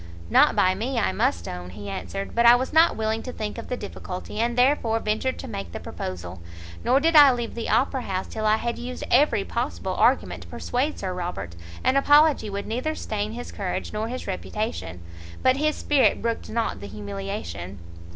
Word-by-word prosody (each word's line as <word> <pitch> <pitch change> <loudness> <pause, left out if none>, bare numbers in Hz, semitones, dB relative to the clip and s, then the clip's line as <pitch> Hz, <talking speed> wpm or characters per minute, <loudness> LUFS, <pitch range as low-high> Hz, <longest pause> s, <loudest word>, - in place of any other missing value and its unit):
"Not - - +5
by 185 0 +4
me, 235 +7 -3
I 225 - +2
must 85 -2 0
own," 90 0 -6
he 100 +2 -9
answered; 195 - -5
"but 235 - +3
I 235 +1 +9
was 260 +3 -2
not 325 +2 +5
willing 220 0 -1
to 255 - -6
think 215 -1 -5
of - - -8
the 250 - -2
difficulty, 200 -1 -7
and 235 +1 0
therefore 245 -3 +3
ventured 220 +5 -1
to - - -7
make 95 -4 -6
the - - -4
proposal: 90 -1 -6 0.4
nor 255 +3 +4
did 325 +3 +2
I 290 -2 +10
leave 240 -2 -3
the 235 - -4
Opera 265 0 +2
house 190 -4 -3
till 215 -1 -3
I 215 - +5
had 235 +1 -3
used 250 +1 -6
every 290 +4 +4
possible - - -3
argument - - +2
to - - -11
persuade 270 +5 -2
Sir 185 -2 -3
Robert 175 - -5 0.3
an 260 - +3
apology 290 -4 +5
would 200 0 -4
neither 255 +8 -2
stain 215 -4 -3
his 245 +1 -7
courage 195 0 -4
nor 215 +1 -2
his 255 +2 -5
reputation. 190 - -4 0.4
But 260 +1 +4
his 305 +1 +1
spirit 285 -3 +3
brooked 230 0 -3
not 230 - -1
the 100 - -8
humiliation." 100 -3 -6
220 Hz, 200 wpm, -25 LUFS, 180-255 Hz, 0.4 s, I